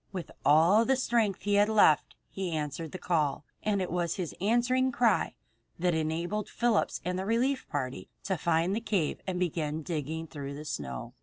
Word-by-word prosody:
With 185 -3 -6
all 165 +9 +5
the 265 +3 +3
strength 230 -6 0
he 205 - 0
had 205 +1 +4
left 205 -9 +4 0.2
he 190 -2 -3
answered 150 +1 -3
the - - -5
call, 155 -5 0 0.2
and 200 -3 0
it 180 - -5
was 175 -1 0
his 180 -5 -4
answering 245 +5 +2
cry 230 -8 +2 0.4
that 175 0 +1
enabled 165 +6 -2
Phillips 235 -2 +1
and 180 +1 -1
the 190 - -3
relief 255 +4 0
party 130 -3 -4
to 190 - 0
find 170 +2 +1
the 225 - -2
cave 195 -9 -1
and 180 -1 -2
begin 160 -3 -1
digging 160 0 -3
through 140 -2 -7
the 150 +1 -8
snow. 65 - -5
180 Hz, 180 wpm, -29 LUFS, 155-210 Hz, 0.4 s, all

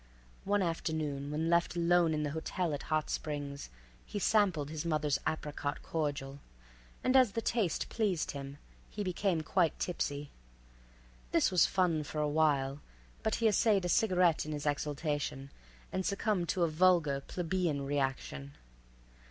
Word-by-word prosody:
One 205 0 +2
afternoon, 155 -4 -2
when 155 +2 -1
left 170 -1 +2
alone 170 -1 +3
in 150 - -1
the 145 - -2
hotel 160 +2 -2
at 145 - -3
Hot 155 -1 +1
Springs, 145 - -4 0.3
he - - -6
sampled 185 -8 +2
his 155 -1 -3
mother's 150 -4 +1
apricot 150 -2 -3
cordial, 140 -3 -3 0.6
and 255 - +2
as 255 -6 +6
the - - -1
taste 215 -9 0
pleased 200 -8 0
him, 140 0 -7 0.3
he 205 - -4
became 185 -2 0
quite 170 +1 +1
tipsy. 145 -4 -3 1.0
This - - +3
was 180 -3 +5
fun 175 -5 +1
for 150 - -7
a 150 - +1
while, 145 -2 +1 0.4
but 220 - 0
he 230 - +2
essayed 205 -2 +3
a - - -1
cigarette 180 -6 +3
in 155 - -5
his 145 0 -4
exaltation, 145 -1 -2 0.4
and 190 - -1
succumbed 200 -3 0
to 180 - +1
a - - +4
vulgar, 160 -4 +3
plebeian 170 -5 -1
reaction. 135 - -2
160 Hz, 150 wpm, -32 LUFS, 145-185 Hz, 1.0 s, as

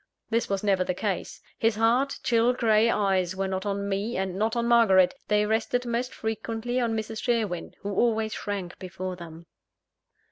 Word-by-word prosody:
This 230 +1 +1
was 195 0 -1
never 195 -3 +2
the 180 - -2
case. 195 -2 -3 0.2
His 225 -1 +2
hard, 235 +5 +2
chill 235 +1 +3
grey 225 -2 +3
eyes 190 -4 +1
were 195 0 -1
not 190 +1 -3
on 200 0 -2
me, 200 +3 -2
and 190 -1 -2
not 220 +4 0
on 235 0 0
Margaret: 210 -6 +5
they 210 0 +3
rested 225 +3 0
most 240 +2 -2
frequently 225 +2 -3
on 230 -2 0
Mrs. 220 0 -4
Sherwin, 220 -8 -1
who 200 0 -4
always 220 0 +1
shrank 195 -4 -5
before 185 0 -5
them. 170 -1 -11
215 Hz, 175 wpm, -26 LUFS, 190-230 Hz, 0.2 s, Margaret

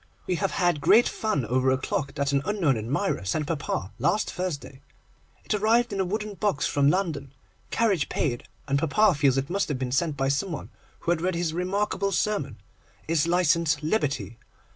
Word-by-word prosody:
We 185 - -1
have 195 +1 -1
had 175 -5 +1
great 235 +10 +6
fun 215 - -1
over 130 +3 +1
a 130 - +3
clock 140 +2 -3
that 140 0 0
an 140 -1 +2
unknown 185 -9 +1
admirer 120 - -1
sent 125 +11 -1
papa 145 - -3
last 215 - +1
Thursday. 145 -7 -5 0.6
It - - -1
arrived 220 +3 +2
in 195 - -3
a 190 - +2
wooden 210 +3 -3
box 200 -7 0
from 140 -1 +3
London, 150 -7 -1 0.4
carriage 200 -10 +1
paid, 120 -5 -1 0.2
and 140 0 +1
papa 185 +7 +3
feels 140 -3 +2
it 135 +5 -2
must 195 -1 0
have 145 - -1
been 125 -1 -3
sent 145 +2 0
by 135 0 +1
some 140 +7 0
one 155 - -6 0.3
who 170 - 0
had 170 -2 0
read 185 0 0
his 170 -2 -1
remarkable 195 +2 -1
sermon, 195 - -1 0.5
'Is 165 0 +2
Licence 170 -3 +2
Liberty? 140 - -1
160 Hz, 185 wpm, -26 LUFS, 140-195 Hz, 0.6 s, great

